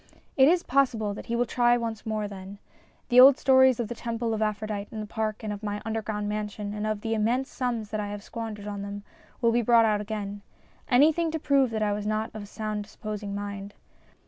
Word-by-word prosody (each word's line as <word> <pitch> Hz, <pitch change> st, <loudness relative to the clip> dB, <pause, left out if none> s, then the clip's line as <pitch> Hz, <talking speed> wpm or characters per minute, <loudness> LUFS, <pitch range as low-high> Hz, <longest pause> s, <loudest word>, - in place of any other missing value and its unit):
It 265 Hz, -1 st, +6 dB
is 345 Hz, +2 st, +3 dB
possible 240 Hz, -6 st, +1 dB
that -, -, -9 dB
he 235 Hz, -, -1 dB
will 240 Hz, +1 st, +2 dB
try 240 Hz, +1 st, +3 dB
once 230 Hz, -2 st, -4 dB
more 215 Hz, -1 st, -1 dB
then. 195 Hz, 0 st, -9 dB, 0.5 s
The 245 Hz, 0 st, +6 dB
old 265 Hz, +1 st, +9 dB
stories 260 Hz, -3 st, +5 dB
of 235 Hz, -, -1 dB
the 240 Hz, -, -4 dB
Temple 230 Hz, -1 st, -3 dB
of 220 Hz, -, -2 dB
Aphrodite 215 Hz, -1 st, -2 dB
in 220 Hz, -, -6 dB
the 215 Hz, -, -4 dB
park 215 Hz, 0 st, -3 dB
and 210 Hz, -1 st, -2 dB
of 205 Hz, -, -8 dB
my 205 Hz, -1 st, -3 dB
underground 215 Hz, -2 st, -3 dB
mansion 210 Hz, -1 st, -4 dB
and 210 Hz, 0 st, -3 dB
of 215 Hz, -1 st, -2 dB
the 225 Hz, 0 st, -2 dB
immense 235 Hz, +5 st, 0 dB
sums 235 Hz, -5 st, -3 dB
that 215 Hz, -, -2 dB
I 205 Hz, -, -2 dB
have 205 Hz, 0 st, -6 dB
squandered 220 Hz, -3 st, -6 dB
on 205 Hz, -1 st, -5 dB
them 200 Hz, 0 st, -6 dB, 0.4 s
will 235 Hz, -1 st, +4 dB
be 240 Hz, +1 st, +2 dB
brought 235 Hz, 0 st, +5 dB
out 210 Hz, -1 st, +1 dB
again 205 Hz, -1 st, -5 dB, 0.5 s
anything 310 Hz, +6 st, +4 dB
to 320 Hz, 0 st, -3 dB
prove 275 Hz, -3 st, +3 dB
that 220 Hz, -1 st, -1 dB
I 205 Hz, -1 st, +1 dB
was 205 Hz, 0 st, -3 dB
not 215 Hz, +1 st, -1 dB
of 210 Hz, -2 st, -7 dB
sound 215 Hz, -1 st, -3 dB
disposing 210 Hz, -1 st, -6 dB
mind. 200 Hz, 0 st, -6 dB
215 Hz, 225 wpm, -27 LUFS, 205-240 Hz, 0.5 s, old